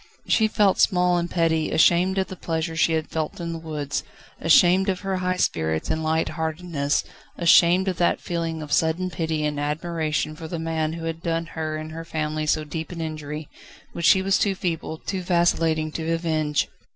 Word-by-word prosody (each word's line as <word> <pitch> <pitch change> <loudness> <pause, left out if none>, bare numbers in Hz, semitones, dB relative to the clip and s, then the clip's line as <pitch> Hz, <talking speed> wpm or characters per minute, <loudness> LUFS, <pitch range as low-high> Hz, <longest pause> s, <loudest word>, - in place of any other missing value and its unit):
She 220 - +4
felt 210 -3 +2
small 180 -1 +3
and 170 0 -3
petty: 160 -2 +1
ashamed 180 +4 +3
of 190 - +2
the 185 - -8
pleasure 165 -1 -3
she 165 0 +2
had 160 -1 -1
felt 160 +1 -3
in 170 -1 -4
the 165 - -5
woods, 150 -3 -3 0.4
ashamed 180 +4 +5
of 185 -1 -1
her 195 -1 -2
high 185 0 -1
spirits 80 - 0
and 160 - -1
light 160 +1 +1
heartedness, 160 -3 -1 0.3
ashamed 175 +2 +5
of 185 -3 -1
that 175 - +2
feeling 165 -2 -3
of 150 - -9
sudden 170 +3 +1
pity 160 -2 -1
and 150 -1 -2
admiration 155 0 -2
for 160 +1 -8
the 170 - -4
man 160 -1 -2
who 165 0 -6
had 165 0 -4
done 165 0 -1
her 155 -1 -3
and 155 0 -7
her 165 +1 -6
family 155 -1 -3
so 155 0 +2
deep 160 +2 -6
an 175 - -7
injury, 155 -1 -5 0.5
which 170 - 0
she 190 - +5
was 195 0 +2
too 200 -2 +1
feeble, 165 -3 -3
too 190 +3 -4
vacillating 165 -3 +1
to 160 +1 -3
avenge. 155 -3 0
165 Hz, 195 wpm, -24 LUFS, 155-175 Hz, 0.5 s, ashamed